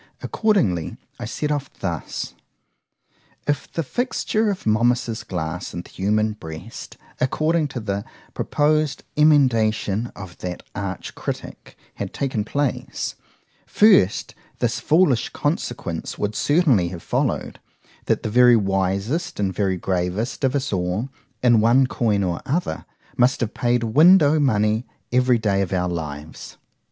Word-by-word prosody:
—Accordingly 115 - +1 0.2
I - - -4
set 150 0 -2
off 145 -2 -2
thus: 85 -4 -4 1.1
If 145 -2 -2
the 165 - -2
fixture 220 - 0
of 195 - -4
Momus's 115 +1 +1
glass 90 -1 -4
in 85 - -4
the - - -17
human 105 +3 +1
breast, 80 -7 -9 0.2
according 155 +4 +1
to 130 -3 -5
the 100 -2 -3 0.3
proposed 150 0 +1
emendation 120 -7 +3
of 95 -3 -10
that 90 -1 -5
arch 100 -2 -5
critick, - - -7 0.2
had - - -6
taken 130 -6 -1
place,——first, 145 - 0 0.2
This - - 0
foolish 150 -7 +3
consequence 120 - -3
would 105 +1 -1
certainly 140 - +3
have 85 -1 -7
followed,—That - - -3
the - - -2
very 125 +1 +7
wisest 100 - -1
and 95 -2 0
very 95 -1 0
gravest 95 +8 -2
of 135 +1 +2
us 135 -5 -1
all, 90 +7 -1 0.3
in 120 -3 +5
one 120 +4 +5
coin 110 -5 0
or 90 -2 -2
other, 170 +6 -2 0.3
must 125 0 +3
have 115 -2 -1
paid 120 -1 +1
window 155 +5 +6
money 110 -4 +2 0.3
every 125 0 +4
day 100 -3 +1
of 95 - -2
our 90 -1 0
lives. 75 -2 -6
115 Hz, 130 wpm, -22 LUFS, 95-145 Hz, 1.1 s, very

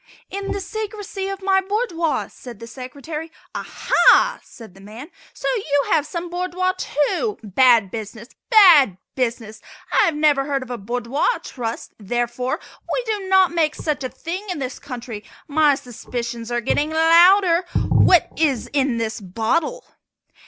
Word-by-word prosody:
"In 395 0 -4
the - - -2
secrecy 410 -1 -5
of 390 0 -6
my 385 0 +3
boudoir," 375 - -1
said 245 -4 -12
the 230 - -8
Secretary. 285 +6 -8 0.2
"Aha!" - - +3
said 225 -6 -14
the 195 - -16
man, 225 - -11 0.2
"so - - -6
you 285 - 0
have 300 -2 +2
some 340 +2 -5
boudoir, 365 +1 -1
too! 370 - -1
Bad 225 -1 +4
business! 220 +1 -7 0.2
bad 340 - +7 0.2
business! 230 -4 -3 0.3
I - - +5
have 325 - 0
never 295 -2 +2
heard 275 -2 -2
of 250 - -10
a 245 - -3
Boudoir 240 +6 -2 0.2
Trust, 230 -3 -6
therefore, 240 +4 -2 0.3
we - - -1
do 420 -4 -3
not 380 -2 +5
make 325 -3 +1
such 300 -3 -3
a 255 - -3
thing 350 +9 -6
in 360 - -3
this 260 -2 -5
country. 245 -6 -8 0.2
My 295 -1 +3
suspicions 240 -2 -6
are 240 0 0
getting 290 +5 0
louder. 340 +3 +5 0.3
What 355 -4 +5
is 280 -7 0
in 270 -4 +1
this 225 -1 -3
bottle?" 235 - -2
290 Hz, 150 wpm, -21 LUFS, 240-360 Hz, 0.3 s, bad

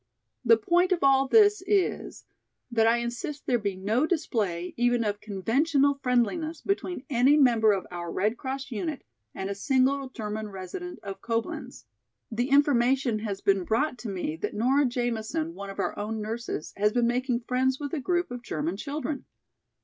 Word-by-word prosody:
"The 230 -2 +6
point 350 - +2
of 355 -4 +1
all 270 0 +5
this 415 +3 +5
is 395 -2 0 0.5
that 225 -1 +3
I 230 +1 +4
insist 240 +5 -4
there 245 -2 +2
be 200 -3 -2
no 215 +10 +1
display 205 - -1
even 245 0 +2
of 205 -1 -2
conventional 275 - +1
friendliness 285 +6 0
between 370 -7 -2
any 270 +3 +4
member 230 -6 +5
of 195 -2 -1
our 175 -1 -5
Red 210 +4 0
Cross 270 +2 -5
unit 270 +6 -3 0.3
and 190 - -3
a 200 - -2
single 265 +4 +1
German 215 -3 -5
resident 205 - -7
of 195 -1 -7
Coblenz. 230 -1 -4 0.5
The 240 +4 -1
information 265 -4 +3
has 205 -3 -4
been 195 -2 +2
brought 250 - 0
to 235 - -5
me 180 -5 -3
that 170 - -4
Nora 265 +6 +3
Jamison, 245 +6 -2
one 200 -7 -7
of 195 - -8
our - - -1
own 215 +2 -3
nurses, 220 -6 -4
has 210 +1 +3
been 240 +1 +2
making 245 0 0
friends 255 +2 0
with 290 +1 -5
a 320 - 0
group 350 +2 0
of 245 -1 -5
German 165 -4 -3
children. 290 +3 -4
245 Hz, 170 wpm, -27 LUFS, 215-280 Hz, 0.5 s, The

